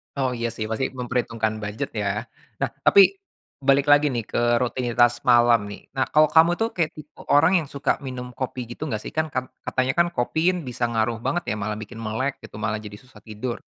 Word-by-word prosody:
Oh, 130 -2 0
iya 115 - -1
sih, 110 - -3
pasti 120 +4 -1
memperhitungkan 115 -3 -1
budget 105 +1 -4
ya. 105 -2 -2 0.5
Nah, - - +1 0.2
tapi 200 - +8 0.6
balik 140 +1 +3
lagi 145 +1 +6
nih 115 -2 -2
ke - - -1 0.2
rutinitas 120 -1 +2
malam 120 -3 +5
nih. 100 - -9 0.2
Nah, 130 - +2
kalau 155 0 +6
kamu 160 +1 +6
itu 225 - 0
kayak 165 -3 0
tipe 150 -1 -13
orang 160 +6 +5
yang 155 - -6
suka 140 0 -1
minum 125 -1 -6
kopi 125 -1 -5
gitu 155 - -5
nggak, 110 -4 -3
sih? - - -7
Kan 155 0 +1
kat 130 0 -2 0.2
katanya 130 +1 0
kan 170 0 +4
kopi 170 +8 +1
bisa 125 -1 -5
ngaruh 115 0 0
banget 175 0 0
ya, 110 - 0
malah 105 +1 -2
bikin 115 +2 -9
melek 115 +5 -2
gitu, 105 - -13
malah 110 0 -1
jadi 105 -1 -9
susah 125 -4 -18
tidur. 110 +3 -4
125 Hz, 205 wpm, -24 LUFS, 115-140 Hz, 0.6 s, tapi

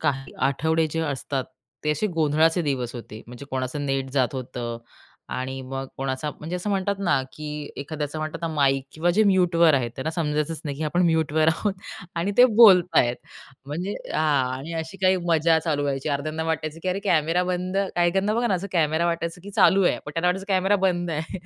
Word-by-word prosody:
काही 135 -3 -2
आठवडे 160 +3 +2
जे 165 - -2
असतात, 140 -3 -2 0.4
ते 150 - +2
असे 150 +7 0
गोंधळाचे 160 -1 +2
दिवस 130 -5 -2
होते. 115 -2 -9
म्हणजे 125 +3 -10
कोणाचं 130 +2 -3
नेट 135 -1 -1
जात 130 -1 +1
होतं 120 -2 -5 0.5
आणि 130 +1 -4
मग 135 +1 -5
कोणाचा 135 +2 -3
म्हणजे 165 +4 -4
असं 180 +4 -3
म्हणतात 200 0 0
ना, 175 -9 +1
की 150 -1 -6
एखाद्याचं 150 +1 -4
म्हणतात 155 +1 -4
ना, 165 - -1
माईक 135 -2 +2
किंवा 170 +3 +1
जे 205 +5 +3
म्यूटवर 175 -5 +4
आहेत, 125 -4 0
त्यांना 145 +4 -2
समजायचंच 150 -1 -1
नाही 145 -2 -4
की 155 - -5
आपण 175 +4 +1
म्यूटवर 160 -1 +2
आहोत 180 +6 0 0.4
आणि 175 +4 0
ते 250 - +10 0.2
बोलताहेत 180 - +6 0.5
म्हणजे 175 +8 -3 0.2
हां. 140 -5 +1
आणि 155 +5 -7
अशी 160 +4 -8
काही 185 0 +4
मजा 165 0 +4
चालू 155 -3 -1
व्हायची 140 0 -2
अर्ध्‍यान्न्‍या 155 +3 -2
वाटायचं 155 -1 -2
की 185 - -2
अरे 185 +2 -1
कॅमेरा 170 -1 +2
बंद 180 +1 -2 0.2
काही 175 0 +3
काहींना 195 +4 0
बघा 240 +1 +1
ना, 205 - +2
असं 185 +2 -3
कॅमेरा 160 -1 +2
वाटायचं, 170 0 -2
की 200 +3 -10
चालू 195 0 +4
आहे, - - +2
पण 150 - -6
त्यांना 165 +2 +1
वाटायचं 190 +2 -1
कॅमेरा 190 +2 +3
बंद 175 -2 -1
आहे. 160 +4 -4
160 Hz, 195 wpm, -24 LUFS, 140-175 Hz, 0.5 s, ते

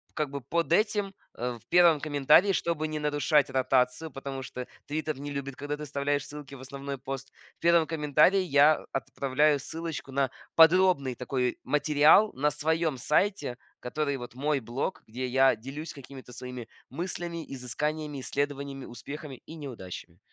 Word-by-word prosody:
как 150 -2 -1
бы 140 0 -5
под 165 +4 -1
этим, 205 -1 +1 0.2
э, 120 0 -3
в - - -29
первом 170 -3 +6
комментарии, 155 +6 +4
чтобы 160 -3 -1
не 155 0 -3
нарушать 150 0 +2
ротацию, 130 +3 +1
потому 135 -1 -6
что 125 -1 -7 0.2
"Твиттер" 155 -1 -3
не 145 +1 -5
любит, 140 -1 -4
когда 145 +1 -4
ты 150 - -6
вставляешь 145 0 -1
ссылки 145 -1 -9
в 130 - -11
основной 140 0 -6
пост. 135 0 -6 0.3
В - - -45
первом 170 -2 +4
комментарии 155 +4 +3
я 150 -3 +4
отправляю 140 +3 +1
ссылочку 160 -1 -6
на 135 -1 +1 0.3
подробный 165 -6 +5
такой 125 0 -1
материал 150 +7 +5
на 150 +3 +1
своем 160 0 0
сайте, 155 - +1 0.2
который 140 +2 -2
вот 120 -1 -9
мой 145 +1 0
блог, 120 - -3
где 125 +4 -4
я 135 0 +4
делюсь 135 +8 -7
какими-то 135 -2 -11
своими 125 -2 -7 0.2
мыслями, 170 +2 -4
изысканиями, 145 +3 -3
исследованиями, 140 -1 -3
успехами 140 +2 -8
и 160 - -9
неудачами. 95 - -8
145 Hz, 155 wpm, -28 LUFS, 135-155 Hz, 0.3 s, первом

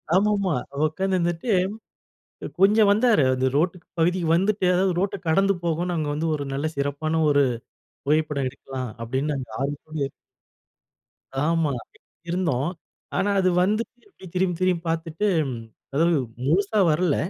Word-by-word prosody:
ஆமாமா. 200 -2 +2 0.3
உட்கார்ந்து 190 +5 0
இருந்துட்டு 175 +5 -1 0.9
அ - - -2
கொஞ்சம் 205 +1 +6
வந்தாரு. 215 - +4
அந்த 130 0 +1
ரோட் 170 +4 +1 0.2
பகுதிக்கு 175 +1 +2
வந்துட்டு, 195 +2 +1
அதாவது 185 0 +2
ரோட்ட 200 +2 0
கடந்து 195 +5 +3
போகுன்னு 170 +1 -1
அங்க 155 -2 -1
வந்து 155 +3 -1
ஒரு 145 -1 -4
நல்ல 145 +3 -1
சிறப்பான 145 +3 -1
ஒரு 145 -1 +4 0.6
புகைப்படம் 150 -3 +1
எடுக்கலா 135 0 -7 0.2
அப்பிடின்னு 135 +5 -1 0.2
ஆர்வத்தோடு 145 0 -3 1.4
ஆமா. 165 -3 +2 0.6
இருந்தோம். 165 -6 0 0.5
ஆனா 205 - +1
அது 185 -1 +3
வந்துட்டு 215 +5 -1
இப்டி 280 - -15
திரும்பி, 180 -1 +1
திரும்பி 180 -2 +1
பார்த்துட்டு 165 +4 -1 0.2
ம் 115 - -5 0.3
அதாவது 165 +3 +3 0.3
முழுசா 200 +7 +2
வரல. 155 0 +2
165 Hz, 130 wpm, -24 LUFS, 150-190 Hz, 1.4 s, கொஞ்சம்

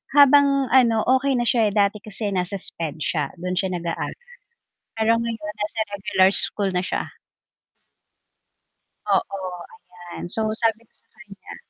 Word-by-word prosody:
habang 280 -2 +5
ano 235 -4 +4 0.2
okey 275 0 0
na 240 - +1
siya 225 -4 +2
dati 205 0 +2
kasi 210 0 -5
nasa 185 +1 -2
SPED 165 -5 -5
siya 150 -3 0
dun 180 +1 -5
siya 185 -2 -1
nag-aaral 170 -1 -4 0.8
pero 225 +1 +2
ngayon 225 -3 -4
nasa 215 +1 -3
regular 195 -2 +2
school 200 -2 0
na 180 - 0
siya. - - -4 2.0
Oo, 190 -2 0 0.4
ayan 175 -1 -10
so 220 - 0 0.2
sabi 225 -1 +1
ko - - -37
sa - - -32 0.4
kanya. - - -10
210 Hz, 140 wpm, -23 LUFS, 185-230 Hz, 2.0 s, habang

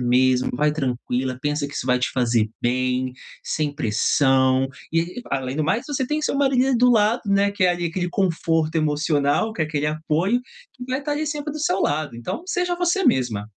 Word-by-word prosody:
mesma, 125 +1 +3
vai 150 +4 +2
tranquila, 130 -2 -2
pensa 150 0 -1
que 145 - -10
isso - - -4
vai 125 0 +3
te 125 - 0
fazer 120 -4 +1
bem, 130 +1 0 0.3
sem 150 -2 -2
pressão. 130 +1 +2 0.2
E 165 +1 +2
e, - - -6
além 135 -1 -2
do 155 - 0
mais, 220 +9 0
você 270 -3 -1
tem 300 +3 -1
seu 290 - 0
marido 270 -2 +2
do 250 +1 +5
lado, 225 +1 +3
né, 200 0 +3
que 200 -2 0
é, - - +5
ali, 175 0 -1
aquele 175 +2 -2
conforto 165 -3 0
emocional, 150 +5 +1
que 200 - -7
é - - +2
aquele 150 -1 -2
apoio, 160 +9 0 0.3
que 250 - -9
vai 260 +2 -2
tá 295 - -4
ali 305 +1 -2
sempre 295 0 -3
do 305 - -6
seu 195 -11 0
lado, 145 -2 -1
então 185 - -5
seja 360 -1 -1
você 355 +2 +1
mesma. 115 -6 +1
155 Hz, 205 wpm, -22 LUFS, -, 0.3 s, do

